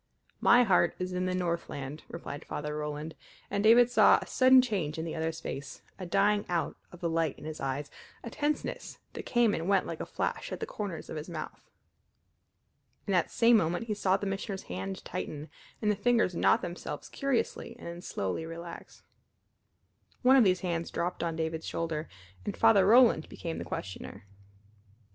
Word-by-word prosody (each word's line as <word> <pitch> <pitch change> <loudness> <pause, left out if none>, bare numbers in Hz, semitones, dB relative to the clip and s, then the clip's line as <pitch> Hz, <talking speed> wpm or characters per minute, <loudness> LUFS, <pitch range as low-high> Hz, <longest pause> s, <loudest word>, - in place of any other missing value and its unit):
"My 245 +1 +6
heart 180 -5 +3
is 180 0 -3
in 180 0 -1
the 185 - -1
Northland," 170 -5 -3
replied 155 -3 -7
Father 150 0 -4
Roland, 150 +1 -4 0.4
and 200 0 0
David 235 +2 +6
saw - - +6
a - - -7
sudden 260 0 +6
change 190 -11 0
in 160 - -3
the 165 - -4
other's 160 0 -2
face, 140 0 -7 0.2
a 185 - -5
dying 205 +3 +3
out 175 -2 -1 0.2
of 175 - -13
the 170 - 0
light 165 -3 0
in 150 - -11
his 155 0 -6
eyes, 135 +1 -3 0.3
a 235 - -6
tenseness 295 +4 -2 0.2
that - - -7
came 240 -3 +3
and 165 +4 -2
went 195 -2 +3
like - - -5
a - - -3
flash - - -3
at - - -4
the - - -3
corners 200 -6 -5
of 160 - -4
his 150 +3 -6
mouth. 155 -3 -7 1.4
In 200 - -2
that 180 -3 +2
same 230 0 +5
moment 175 +3 0
he 220 - -2
saw 195 -2 +2
the - - -5
Missioner's 195 0 -3
hand 95 +2 -6
tighten, 150 +1 -5 0.3
and 210 - +3
the - - 0
fingers 235 -3 +2
knot - - +3
themselves 175 +1 -6
curiously 260 -3 -2
and - - -12
then 170 +1 -6
slowly 100 - -3
relax. 165 +1 -9 1.2
One 260 +2 +7
of 260 - +7
these 185 -3 +3
hands 170 -3 -2
dropped 175 +1 -2
on 165 -1 -1
David's 160 0 -3
shoulder, 160 -1 -3 0.3
and - - -4
Father 200 -4 +5
Roland 230 -7 +6
became 165 -1 -5
the - - -5
questioner. 100 +1 -7
175 Hz, 185 wpm, -30 LUFS, 160-210 Hz, 1.4 s, One